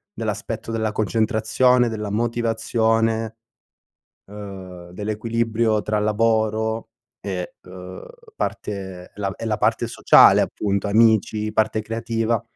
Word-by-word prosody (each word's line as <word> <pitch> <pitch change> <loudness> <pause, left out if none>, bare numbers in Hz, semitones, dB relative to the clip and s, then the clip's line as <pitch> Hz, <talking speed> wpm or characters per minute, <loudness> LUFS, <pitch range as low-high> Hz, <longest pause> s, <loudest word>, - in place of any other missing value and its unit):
dell'aspetto 115 - -4
della 110 -1 -1
concentrazione, 115 +3 +2
della 105 -2 -4
motivazione, 115 -1 0 1.0
uhm, 95 -4 -9
dell'equilibrio 110 +1 -1
tra 105 0 -1
lavoro 110 +1 0 0.3
e, 90 -3 -5
uhm, 90 0 -9 0.3
parte 95 - -5
la 100 -1 -3
e - - -7
la 110 -1 -1
parte 115 +2 +1
sociale 125 - +6
appunto, 100 0 -1
amici, 110 0 +3
parte 110 0 +1
creativa. 115 0 -1
110 Hz, 100 wpm, -22 LUFS, 105-115 Hz, 1.0 s, sociale